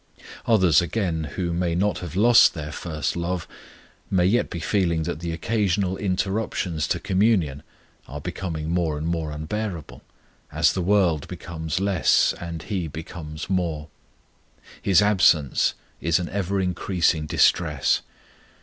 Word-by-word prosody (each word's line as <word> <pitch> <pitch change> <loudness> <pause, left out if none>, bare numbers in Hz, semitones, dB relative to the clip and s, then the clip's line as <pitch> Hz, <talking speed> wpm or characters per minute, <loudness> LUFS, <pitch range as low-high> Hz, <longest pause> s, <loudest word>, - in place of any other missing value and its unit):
Others, 95 -8 +5
again, 85 -4 -2
who 85 -2 -2
may 85 -1 0
not 100 +4 0
have 85 -2 -7
lost 115 0 +6
their 75 -1 -5
first 75 -1 -3
love, 85 0 -3 0.6
may 90 -2 +2
yet 115 +7 +2
be 85 - -5
feeling 85 -2 0
that 80 - -4
the 85 0 -4
occasional 95 +1 0
interruptions 95 -4 -1
to - - -1
communion 95 -8 +1 0.5
are 75 - -7
becoming 80 -1 -4
more 85 -4 0
and 75 - -4
more 80 -2 -2
unbearable, 80 - -5 0.5
as - - +3
the 95 - -2
world 90 -5 +2
becomes 80 -1 -4
less 95 -3 +3
and 85 -2 -6
He 95 -4 -3
becomes 75 0 -7
more. 85 -5 -2 0.9
His 100 0 +4
absence 85 -9 +3 0.3
is 85 0 +2
an 90 -2 -3
ever 100 0 -1
increasing 90 -3 0
distress. 75 -5 +2
85 Hz, 135 wpm, -24 LUFS, 80-95 Hz, 0.9 s, lost